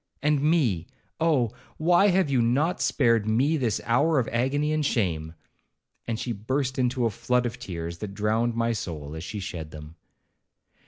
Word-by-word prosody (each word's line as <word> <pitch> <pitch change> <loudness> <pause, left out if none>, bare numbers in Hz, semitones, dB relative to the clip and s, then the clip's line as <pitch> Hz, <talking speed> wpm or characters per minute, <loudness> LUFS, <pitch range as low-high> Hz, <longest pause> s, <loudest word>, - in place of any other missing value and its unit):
And 150 -1 +2
me,—oh! 140 - 0 0.3
why 175 +5 +4
have 185 -3 +3
you 135 -3 +2
not 145 +10 +1
spared 115 -5 +2
me 130 +9 +2
this 120 -8 0
hour 145 +7 +3
of 125 - +1
agony 145 +6 0
and 155 -1 0
shame?' 85 - -1 0.7
and 115 -1 -2
she 120 - -3
burst 130 +5 -2
into 125 -1 +1
a 115 - +1
flood 125 +3 0
of 120 +1 -4
tears, 85 -6 -6
that 100 -2 -6
drowned 110 +3 0
my 115 0 +1
soul 80 -9 -5
as 80 - -6
she 105 +3 -5
shed 90 -6 -6
them. 75 +1 -11
120 Hz, 165 wpm, -26 LUFS, 100-145 Hz, 0.7 s, why